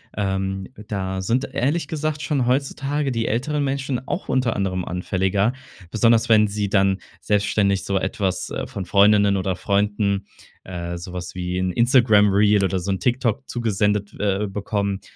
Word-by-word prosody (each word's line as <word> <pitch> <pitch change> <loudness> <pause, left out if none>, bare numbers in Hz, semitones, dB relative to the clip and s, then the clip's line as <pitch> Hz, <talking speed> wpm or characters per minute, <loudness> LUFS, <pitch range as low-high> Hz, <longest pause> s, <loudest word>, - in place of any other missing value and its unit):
Ähm, 95 -1 -2 0.2
da 95 -2 -3
sind 125 +8 0
ehrlich 145 +4 0
gesagt 155 -1 -2
schon 140 -5 0
heutzutage 140 +2 0
die 115 -2 -1
älteren 145 +6 -1
Menschen 135 -2 -2
auch - - -4
unter 130 -3 +1
anderem 95 -2 -1
anfälliger, 95 +4 0 0.4
besonders 115 +1 +3
wenn 110 -1 +5
sie 100 0 -2
dann 95 -1 +2 0.2
selbstständig 100 -2 +1
so 100 0 0
etwas, 95 0 -2
äh, - - -4
von 95 - -6
Freundinnen 100 +1 +4
oder 95 -1 -1
Freunden, 100 0 0 0.4
äh, 85 -1 -5
so 85 +1 -8
was 90 0 -6
wie 90 0 -3
'n 95 0 0
Instagram 120 -4 +5
Reel 100 +1 +4
oder 95 -1 0
so 90 +2 -5
'n 95 -1 0
TikTok 125 +1 0
zugesendet, 105 -3 0
äh, 105 0 0
bekommen, 100 0 -2
105 Hz, 160 wpm, -22 LUFS, 95-120 Hz, 0.4 s, wenn